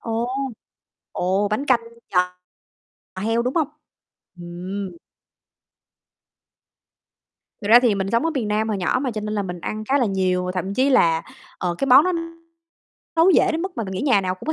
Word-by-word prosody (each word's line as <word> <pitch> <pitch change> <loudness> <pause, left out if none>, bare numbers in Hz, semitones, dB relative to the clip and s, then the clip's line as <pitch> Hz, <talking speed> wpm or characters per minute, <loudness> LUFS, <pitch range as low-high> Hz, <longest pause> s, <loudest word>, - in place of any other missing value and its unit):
Ồ, 230 +1 -2 0.8
ồ, 195 +3 0
bánh 215 +7 -2
canh 255 -4 +4 0.3
giò 180 0 +2 0.9
heo 225 +2 +1
đúng 250 +2 -2
hông? 310 -4 +2 0.7
Ừm. 180 +2 -6 2.6
Thật 205 - -5
ra 235 +3 +9
thì 240 -4 +3
mình 195 0 -2
sống 230 +7 +1
ở 330 - +1
miền 255 -9 -2
Nam 215 +1 0
hồi 210 -3 -1
nhỏ 180 +7 +1
mà 265 - -1
cho 215 -2 -4
nên 210 0 -4
là 205 - 0
mình 180 -2 -6
ăn 215 +4 -4
khá 275 +5 +2
là 245 - +2
nhiều, 185 -2 0
và 180 - -3
thậm 185 +2 -3
chí 265 +5 +2
là, 165 -11 +4 0.4
ờ, 175 -1 -1
cái 275 - 0
món 270 +4 +7
đó 370 - +1 1.0
nấu 330 +3 +6
dễ 370 0 +4
đến 325 +1 -2
mức 380 0 -4
mà 230 - -2
mình 190 - -6
nghĩ 185 - -3
nhà 265 -9 +4
nào 185 -1 -2
cũng 185 - -13
có 315 - +1
215 Hz, 195 wpm, -22 LUFS, 185-255 Hz, 2.6 s, ra